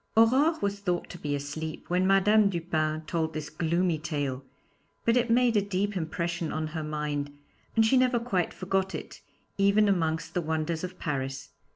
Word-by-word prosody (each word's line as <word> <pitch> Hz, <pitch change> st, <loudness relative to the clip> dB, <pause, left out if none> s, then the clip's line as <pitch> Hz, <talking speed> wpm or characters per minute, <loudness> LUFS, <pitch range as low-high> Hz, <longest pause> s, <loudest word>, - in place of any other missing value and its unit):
Aurore 270 Hz, +8 st, +5 dB
was 200 Hz, 0 st, -1 dB
thought 180 Hz, -3 st, -2 dB
to 175 Hz, -, -9 dB
be 145 Hz, -2 st, -2 dB
asleep 145 Hz, +3 st, -5 dB
when 180 Hz, +1 st, +2 dB
Madame 200 Hz, +2 st, +5 dB
Dupin 160 Hz, -3 st, -1 dB
told 160 Hz, -2 st, -2 dB
this 150 Hz, -1 st, -5 dB
gloomy 170 Hz, +1 st, 0 dB
tale, 145 Hz, -4 st, -3 dB, 0.6 s
but 230 Hz, -, +4 dB
it 245 Hz, -1 st, +2 dB
made 240 Hz, 0 st, +4 dB
a 205 Hz, -, +5 dB
deep 200 Hz, +1 st, -1 dB
impression 170 Hz, -1 st, -2 dB
on 155 Hz, 0 st, -2 dB
her 155 Hz, +1 st, -4 dB
mind, 150 Hz, -1 st, -3 dB, 0.4 s
and 225 Hz, -1 st, +5 dB
she 260 Hz, +4 st, +4 dB
never 255 Hz, -1 st, +3 dB
quite 195 Hz, -7 st, -1 dB
forgot 190 Hz, 0 st, -1 dB
it, -, -, -8 dB, 0.4 s
even 200 Hz, +2 st, +4 dB
amongst 165 Hz, -3 st, 0 dB
the 175 Hz, -, 0 dB
wonders 160 Hz, +1 st, -2 dB
of 185 Hz, 0 st, -5 dB
Paris. 135 Hz, -2 st, -3 dB
170 Hz, 175 wpm, -28 LUFS, 155-200 Hz, 0.6 s, Aurore